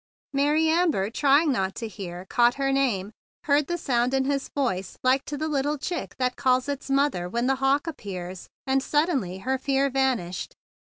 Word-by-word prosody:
Mary 295 +3 +3
Amber, 315 - +2
trying 290 +4 +4
not 195 -6 -1
to 230 - -4
hear, 190 -5 -7
had 190 - -15
caught 240 0 +4
her 275 -1 0
name, 225 -8 0 0.3
heard 290 0 +2
the 345 - -1
sound 250 -4 +1
in 265 0 +1
his 275 0 -1
voice 195 -9 -1
like 260 +2 +3
to 295 - -5
the 310 +2 -2
little 295 0 0
chick 340 +5 -4
that 250 -1 0
calls 255 -1 +2
its 280 -1 -4
mother 270 -11 +1
when 235 +5 -1
the 270 +1 +2
hawk 275 +3 +2
appears; 190 - -6 0.2
and 265 0 +2
suddenly 275 - 0
her 265 0 0
fear 275 +1 +1
vanished. 250 -10 -1
270 Hz, 185 wpm, -26 LUFS, 230-285 Hz, 0.3 s, trying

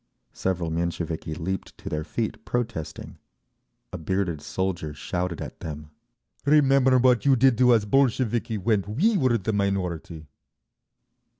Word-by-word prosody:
Several 90 -3 -2
Mensheviki 80 -1 -3
leaped 95 +4 -4
to 105 -2 -12
their 75 -4 -2
feet 110 +6 -4
protesting. 115 -10 -4 0.7
A 90 - -4
bearded 85 -1 -1
soldier 85 -3 -3
shouted 90 +3 -3
at - - -8
them, 75 -1 -7 0.5
"Remember 135 -3 +4
what 125 -1 +4
you 140 -2 +5
did 130 0 +4
to 125 -1 +6
us 110 -3 +4
Bolsheviki 120 -2 +1
when 105 +1 +1 0.2
we 215 +8 +3
were 130 -9 +3
the 110 +1 -2
minority!" 90 -5 -2
100 Hz, 130 wpm, -25 LUFS, 85-120 Hz, 0.7 s, to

